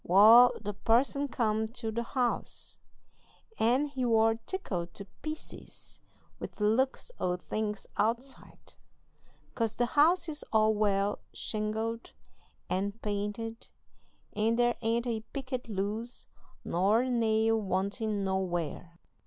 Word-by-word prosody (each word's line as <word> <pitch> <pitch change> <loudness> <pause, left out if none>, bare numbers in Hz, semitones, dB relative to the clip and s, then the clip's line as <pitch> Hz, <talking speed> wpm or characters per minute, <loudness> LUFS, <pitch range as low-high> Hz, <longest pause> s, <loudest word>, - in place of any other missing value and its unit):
Wal, 220 +7 +8
the 210 -1 -4
parson 245 +7 +2
come 220 -4 0
to 225 -1 -4
the 235 +2 -2
house, 245 0 -2 0.8
and 250 +6 +3
he 270 -3 -4
war 225 -2 +4
tickled 175 - -3
to 200 - -6 0.2
pieces 310 0 -8 0.4
with - - -6
the 210 - -4
looks 260 - +1
o' 180 0 0
things 210 +2 -3
outside, 240 +5 -3 0.8
'cause 225 -2 -1
the 240 - +2
house 325 +7 +3
is 305 -2 -5
all 220 0 +4
well 205 -1 +1
shingled 220 +2 -3 0.5
and 200 +3 -2
painted, 210 +3 -3 0.7
and 225 +2 +1
there 240 0 +3
ain't 230 +1 0
a 230 -2 -1
picket 260 -3 -4
loose 215 +4 -2 0.4
nor 195 +6 +3
a 260 - -2
nail 225 -1 +2
wantin' 200 +2 -1
nowhere. 175 -3 -2
225 Hz, 120 wpm, -30 LUFS, 205-240 Hz, 0.8 s, Wal